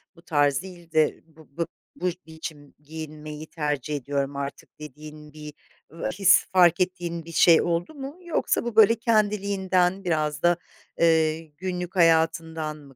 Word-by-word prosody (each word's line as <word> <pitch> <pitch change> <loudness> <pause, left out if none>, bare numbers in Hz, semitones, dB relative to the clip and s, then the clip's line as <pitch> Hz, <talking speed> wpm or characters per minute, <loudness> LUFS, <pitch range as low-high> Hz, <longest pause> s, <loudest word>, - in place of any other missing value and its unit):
bu 170 - -18
tarz 145 -4 +1
değil 175 -3 -12
de 155 -1 +2
bu 160 -1 -19
b 170 - 0 0.3
bu 180 +1 -1 0.2
biçim 160 -3 -9
giyinmeyi 155 0 -8
tercih 150 -2 -3
ediyorum 140 +1 -2
artık 140 +2 -7
dediğin 150 0 -11
bir, 150 -1 -9 0.4
ııı, 165 +1 -4
his, 190 -1 +4
fark 175 -2 +5
ettiğin 175 -2 -2
bir 165 - -9
şey 165 0 +6
oldu 170 - -2
mu? 280 +2 -8
Yoksa 345 - 0
bu 235 -2 -4
böyle 220 +1 +7
kendiliğinden 200 -4 +1
biraz 155 -3 -1
da, 175 0 +4 0.4
eee, 160 -1 +3 0.2
günlük 180 +1 -4
hayatından 160 -2 +2
mı 140 -3 -16
165 Hz, 150 wpm, -25 LUFS, 150-180 Hz, 0.4 s, böyle